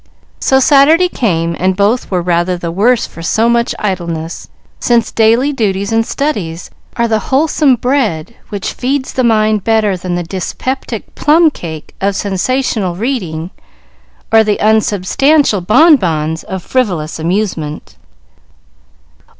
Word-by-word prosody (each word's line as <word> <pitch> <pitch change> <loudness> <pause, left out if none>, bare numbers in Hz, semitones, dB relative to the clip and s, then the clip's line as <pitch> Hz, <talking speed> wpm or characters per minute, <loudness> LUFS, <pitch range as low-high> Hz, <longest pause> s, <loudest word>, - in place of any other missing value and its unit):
So 265 - +3
Saturday 295 +6 +5
came, 170 - -1
and 185 +1 +1
both 205 +5 +1
were 180 -3 -1
rather 175 +1 0
the 170 -1 -4
worse 230 +7 +2
for 165 - -11
so 220 +7 +1
much 235 0 +1
idleness, 170 -5 -4 0.3
since 235 -2 +1
daily 230 +6 +2
duties 200 -5 -1
and 225 0 +2
studies 205 - -3 0.2
are 235 -1 +1
the 220 -1 +1
wholesome 285 -1 +3
bread 235 - -1 0.2
which 205 -3 -4
feeds 260 +1 -2
the 255 - 0
mind 215 -3 +2
better 220 -3 +1
than 180 0 -4
the 175 - -2
dyspeptic 220 +7 -5
plum 315 +1 +3
cake 160 - -8
of 200 0 0
sensational 200 -1 -1
reading, 185 - -3 0.8
or 225 0 +6
the 210 -1 0
unsubstantial 220 +4 +2
bon 295 - +5
bons 160 - -2
of 190 -2 -6
frivolous 180 -13 -2
amusement. 165 -3 -3
215 Hz, 135 wpm, -13 LUFS, 175-250 Hz, 0.8 s, or